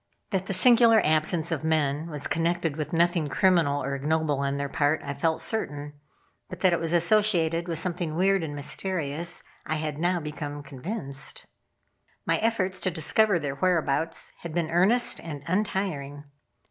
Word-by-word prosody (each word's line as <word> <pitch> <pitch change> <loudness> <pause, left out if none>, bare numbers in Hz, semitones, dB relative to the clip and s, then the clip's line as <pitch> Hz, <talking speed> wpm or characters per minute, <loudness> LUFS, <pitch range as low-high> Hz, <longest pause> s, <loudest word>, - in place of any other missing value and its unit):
That 190 -1 -1
the - - -1
singular 230 +2 +6
absence 155 +2 +1
of 160 -2 -2
men 155 -1 0
was 150 -2 -3
connected 165 -2 0
with 155 +1 -4
nothing 170 -2 +2
criminal 160 -3 +2
or 140 - -3
ignoble 150 +1 0
on 140 0 -1
their 140 0 -2
part 145 +2 +1
I 140 - -4
felt 160 +3 0
certain; 145 -9 -3 0.6
but 180 -2 -9
that 185 -2 +4
it 170 - +1
was 165 -1 -2
associated 170 -2 +3
with 165 -2 -2
something 170 -2 -1
weird 195 +2 +2
and 150 -3 -5
mysterious 165 +1 -2 0.2
I 155 - -2
had 155 -1 -4
now 175 +1 +1
become 150 -2 -6
convinced. 140 - -5 0.8
My - - +1
efforts 195 -5 0
to 185 - 0
discover 180 +5 +2
their 145 -4 -3
whereabouts 165 -2 0
had 170 -2 -8
been 165 -2 -1
earnest 200 +9 +3
and 150 -4 -8
untiring. 170 -7 -2
165 Hz, 160 wpm, -26 LUFS, 145-185 Hz, 0.8 s, singular